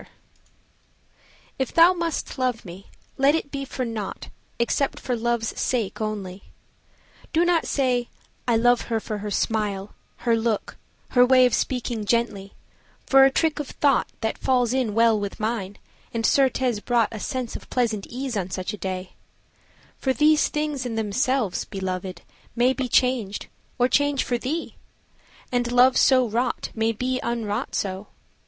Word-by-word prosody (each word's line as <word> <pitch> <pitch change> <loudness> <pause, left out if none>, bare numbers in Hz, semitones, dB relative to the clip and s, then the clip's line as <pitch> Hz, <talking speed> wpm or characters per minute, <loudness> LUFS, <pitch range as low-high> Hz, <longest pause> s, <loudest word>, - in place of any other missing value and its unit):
XIV - - -16 1.5
If 265 - -2
thou 335 +2 +7
must 335 -5 -3
love 250 -4 -1
me, 185 +2 -10 0.3
let 275 +3 +4
it 285 -3 -3
be 275 -1 -4
for 260 -1 -4
nought 220 -4 -5 0.3
Except 255 +4 0
for 250 - -2
love's 235 -1 0
sake 225 -5 -1
only. 200 -3 -4 0.9
Do 330 +2 +3
not 345 -2 +2
say 250 -3 0 0.4
I 235 - +3
love 245 +1 +2
her 225 -1 +1
for 215 -1 -5
her 210 +1 -4
smile 205 -2 -1 0.3
her 235 -1 +4
look 225 -2 -2 0.3
her 245 - +5
way 255 0 +6
Of 245 - +1
speaking 240 -4 -1
gently, 205 -4 -1 0.5
for 270 0 +7
a - - +6
trick 315 +1 +1
of 295 - -3
thought 280 -1 +2
That 220 -1 -2
falls 250 -2 +2
in 250 -6 0
well 230 -1 +4
with 200 -1 -5
mine, 215 -3 -3 0.3
and 230 -1 -2
certes 260 -4 +2
brought 235 0 +1
A 220 - -6
sense 255 0 -4
of - - -8 0.4
ease 255 0 -4
on 190 -3 -2
such 185 +1 -4
a - - -6
day 185 0 -4 0.9
For 265 - +1
these 300 +2 +4
things 300 -3 -2
in 240 -3 -4
themselves, 225 0 0
Belovèd, 185 -2 -5 0.3
may 245 +2 +3
Be 265 -1 -2
changed, 240 -6 +1 0.3
or 245 -1 +3
change 285 0 +2
for 245 -1 -1
thee, 305 +7 -4 0.7
and 245 -1 0
love, 250 +1 +5
so 255 -2 +5
wrought, 240 +3 -1
May 225 0 +1
be 255 +3 -2
unwrought 230 0 -2
so. 195 +1 -3
240 Hz, 160 wpm, -24 LUFS, 215-260 Hz, 1.5 s, thou